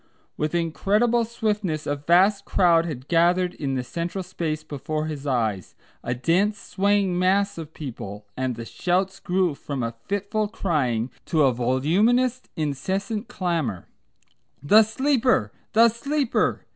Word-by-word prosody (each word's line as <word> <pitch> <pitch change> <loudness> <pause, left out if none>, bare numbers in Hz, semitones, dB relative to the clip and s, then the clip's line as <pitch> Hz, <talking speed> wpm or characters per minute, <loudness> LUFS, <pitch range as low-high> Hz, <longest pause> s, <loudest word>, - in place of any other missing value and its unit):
With 155 +2 -2
incredible 210 +8 +1
swiftness 210 -8 -2
a 145 - 0
vast 180 +7 +3
crowd 170 -4 +3
had 135 -4 -6
gathered 175 +2 +3
in 135 -3 -3
the 130 - -1
central 170 +9 -4
space 160 -4 -3
before 155 +1 -4
his 150 -2 -5
eyes; 110 - -1 0.3
a 120 - -2
dense 185 - +1
swaying 195 -2 0
mass 190 0 +2
of 160 -1 -9
people, 105 -7 -7
and 130 -1 -2
the 115 0 -7
shouts 185 +7 -1
grew 180 -2 +1
from 140 -2 -5
a 115 0 -2
fitful 205 +2 -1
crying 135 - -1
to 160 -3 +2
a 130 -2 +4
voluminous 195 - +2
incessant 190 - -2
clamour: 165 - -2 0.7
"The 210 +10 +7
Sleeper! 250 - +1 0.2
The 230 +2 +7
Sleeper!" 280 +3 -1
175 Hz, 135 wpm, -24 LUFS, 140-205 Hz, 0.7 s, The